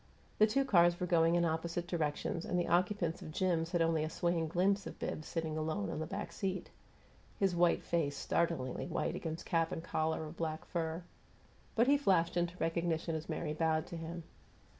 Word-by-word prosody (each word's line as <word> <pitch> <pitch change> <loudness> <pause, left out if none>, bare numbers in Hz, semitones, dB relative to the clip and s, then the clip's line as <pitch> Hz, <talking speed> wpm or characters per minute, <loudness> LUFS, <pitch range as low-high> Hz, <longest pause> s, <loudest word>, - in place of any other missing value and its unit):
The 215 - +7
two 270 +5 +2
cars 175 -7 +5
were 180 - 0
going 165 -1 +4
in 170 0 +3
opposite 170 +1 -1
directions, 165 -1 -1
and 180 - -1
the 175 - 0
occupants 180 -1 +1
of - - -7
Jim's 165 -1 +1
had 175 -2 +3
only 165 -1 +2
a 155 - -2
swaying 170 -1 0
glimpse 190 +5 +1
of - - -8
Bibbs 155 - -4
sitting 160 -2 -2
alone 155 -11 -2
on - - -3
the 160 - -3
back 195 +4 -4
seat 190 -2 -3 0.7
his 195 -3 +2
white 175 0 +3
face 145 -4 0
startlingly 165 -7 -1
white - - -1
against 160 0 -4
cap 165 -1 +1
and 160 - -4
collar 160 -1 -1
of 155 +2 -8
black 160 -1 -3
fur 165 0 -2 0.7
but 230 - +5
he 285 +2 +4
flashed 180 -11 +3
into 175 0 0
recognition 165 0 0
as 160 +1 -4
Mary 155 -1 -2
bowed 160 0 +1
to - - -7
him. 165 +1 -6
170 Hz, 195 wpm, -34 LUFS, 160-175 Hz, 0.7 s, The